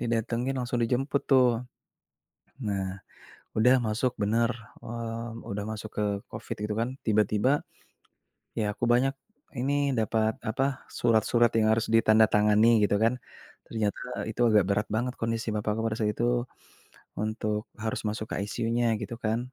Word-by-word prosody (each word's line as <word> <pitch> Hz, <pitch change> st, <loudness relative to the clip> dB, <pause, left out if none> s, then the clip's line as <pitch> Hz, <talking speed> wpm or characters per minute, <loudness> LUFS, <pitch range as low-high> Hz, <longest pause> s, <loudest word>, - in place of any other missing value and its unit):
didatengin 115 Hz, +3 st, -1 dB
langsung 125 Hz, 0 st, -2 dB
dijemput 135 Hz, +4 st, 0 dB
tuh. 125 Hz, -3 st, +4 dB, 1.0 s
Nah, 95 Hz, -2 st, -2 dB, 0.6 s
udah 125 Hz, +4 st, +6 dB
masuk 115 Hz, +4 st, 0 dB
bener, 115 Hz, +3 st, +2 dB, 0.3 s
mmm, 115 Hz, 0 st, -6 dB
udah 100 Hz, +1 st, -3 dB
masuk 110 Hz, 0 st, -6 dB
ke 105 Hz, -, +1 dB, 0.3 s
Covid -, -, -6 dB
gitu 105 Hz, -, -2 dB
kan. 115 Hz, +2 st, 0 dB, 0.2 s
Tiba-tiba, 110 Hz, +6 st, +2 dB, 1.0 s
ya 105 Hz, -1 st, 0 dB
aku 120 Hz, -, -3 dB
banyak 125 Hz, +3 st, +3 dB, 0.5 s
ini 140 Hz, +1 st, +1 dB
dapat 110 Hz, 0 st, 0 dB
apa, 130 Hz, +5 st, +1 dB, 0.2 s
surat-surat 115 Hz, 0 st, +2 dB
yang 110 Hz, 0 st, +3 dB
harus 115 Hz, -, 0 dB
ditandatangani 110 Hz, 0 st, +5 dB
gitu 100 Hz, -, +2 dB
kan. 120 Hz, +3 st, +2 dB, 0.5 s
Ternyata 110 Hz, +3 st, -2 dB
itu 110 Hz, -, -6 dB
agak 105 Hz, -3 st, +5 dB
berat 105 Hz, +1 st, 0 dB
banget 120 Hz, +4 st, -1 dB
kondisi 115 Hz, 0 st, -1 dB
bapakku 105 Hz, 0 st, -1 dB
pada 110 Hz, -, -1 dB
saat 105 Hz, -1 st, +1 dB
itu 120 Hz, +1 st, +2 dB, 0.8 s
untuk 105 Hz, 0 st, -2 dB
harus 110 Hz, 0 st, -3 dB
masuk 110 Hz, +1 st, -3 dB
ke -, -, -2 dB
ICU-nya 115 Hz, 0 st, 0 dB
gitu 110 Hz, +2 st, -5 dB
kan. 115 Hz, +4 st, -2 dB
115 Hz, 140 wpm, -28 LUFS, 110-120 Hz, 1.0 s, udah